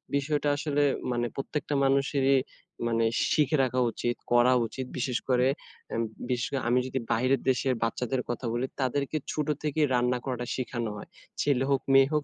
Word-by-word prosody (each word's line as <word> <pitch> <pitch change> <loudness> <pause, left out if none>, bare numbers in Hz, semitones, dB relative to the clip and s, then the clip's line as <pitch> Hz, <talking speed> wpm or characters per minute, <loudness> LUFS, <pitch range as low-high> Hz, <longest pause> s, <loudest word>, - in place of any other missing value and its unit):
বিষয়টা 145 +1 +1
আসলে 145 -1 +1 0.3
মানে 120 0 0
প্রত্যেকটা 145 +2 -3
মানুষেরই 135 0 +3 0.5
মানে 115 -1 +2 0.3
শিখে 150 -1 +3
রাখা 130 0 0
উচিত 120 +1 -2 0.2
করা 120 +1 +5
উচিত 130 +3 -5
বিশেষ 125 -1 0
করে 125 0 +4 0.5
এম 115 - 0 0.3
বিশেষ 125 -2 -1 0.2
আমি 125 +1 +4
যদি 130 +1 -2
বাহিরের 130 +4 +2
দেশের 130 0 +2
বাচ্চাদের 125 +2 -1
কথা 120 +1 -3
বলি 120 +2 0 0.2
তাদেরকে 140 +4 0
ছোট 150 -1 -2 0.2
থেকেই 150 0 +1
রান্না 125 0 +2
করাটা 125 -2 -3
শিখানো 120 -3 -3
হয়। - - -9 0.3
ছেলে 135 -3 +2
হোক, 135 -1 +2
মেয়ে 135 0 +7
হোক 150 -1 +1
130 Hz, 160 wpm, -28 LUFS, 120-140 Hz, 0.5 s, মেয়ে